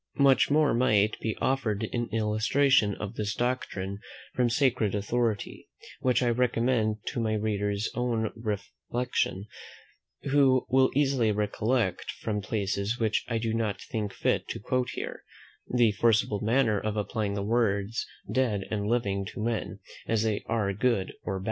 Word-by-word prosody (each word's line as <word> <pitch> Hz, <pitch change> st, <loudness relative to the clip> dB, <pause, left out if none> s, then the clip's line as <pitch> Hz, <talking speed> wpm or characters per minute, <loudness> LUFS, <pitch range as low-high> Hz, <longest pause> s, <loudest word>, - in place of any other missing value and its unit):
Much 135 Hz, -2 st, +5 dB
more 150 Hz, 0 st, +3 dB
might 110 Hz, -3 st, +3 dB
be 110 Hz, -1 st, -3 dB
offered 115 Hz, -6 st, 0 dB
in 120 Hz, -1 st, -1 dB
illustration 110 Hz, +1 st, +2 dB
of 105 Hz, 0 st, -6 dB
this 105 Hz, -2 st, -3 dB
doctrine 100 Hz, -6 st, -2 dB, 0.3 s
from 125 Hz, -1 st, +2 dB
sacred 120 Hz, -5 st, +1 dB
authority, 110 Hz, +1 st, -2 dB, 0.3 s
which 130 Hz, 0 st, +2 dB
I 120 Hz, -, +2 dB
recommend 115 Hz, -3 st, +1 dB
to -, -, -4 dB
my 110 Hz, -1 st, 0 dB
reader's 105 Hz, -1 st, -1 dB
own 115 Hz, -3 st, -1 dB
reflection; 105 Hz, 0 st, -3 dB, 0.8 s
who 135 Hz, -2 st, +3 dB
will 130 Hz, 0 st, +5 dB
easily 135 Hz, -6 st, +2 dB
recollect, 105 Hz, 0 st, 0 dB
from 105 Hz, -2 st, -2 dB
places 100 Hz, +2 st, -1 dB
which 110 Hz, -2 st, +1 dB
I 115 Hz, -, -1 dB
do 110 Hz, 0 st, -1 dB
not 110 Hz, -3 st, -1 dB
think 105 Hz, -2 st, -4 dB
fit -, -, 0 dB
to -, -, -5 dB
quote 125 Hz, +4 st, -1 dB
here, -, -, -5 dB, 0.5 s
the 120 Hz, -3 st, +4 dB
forcible 105 Hz, -1 st, +2 dB
manner 110 Hz, -1 st, +2 dB
of 110 Hz, +1 st, -3 dB
applying 105 Hz, -1 st, -2 dB
the 100 Hz, -, -2 dB
words 105 Hz, -1 st, 0 dB, 0.2 s
dead 115 Hz, -7 st, +1 dB
and 105 Hz, -1 st, -1 dB
living 100 Hz, -4 st, 0 dB
to 105 Hz, -, -8 dB
men, 110 Hz, -3 st, -2 dB, 0.3 s
as 110 Hz, -1 st, +1 dB
they 110 Hz, -2 st, 0 dB
are 110 Hz, -3 st, 0 dB
good 105 Hz, -2 st, 0 dB
or 95 Hz, -2 st, -3 dB
bad. -, -, -5 dB
110 Hz, 150 wpm, -28 LUFS, 105-125 Hz, 0.8 s, Much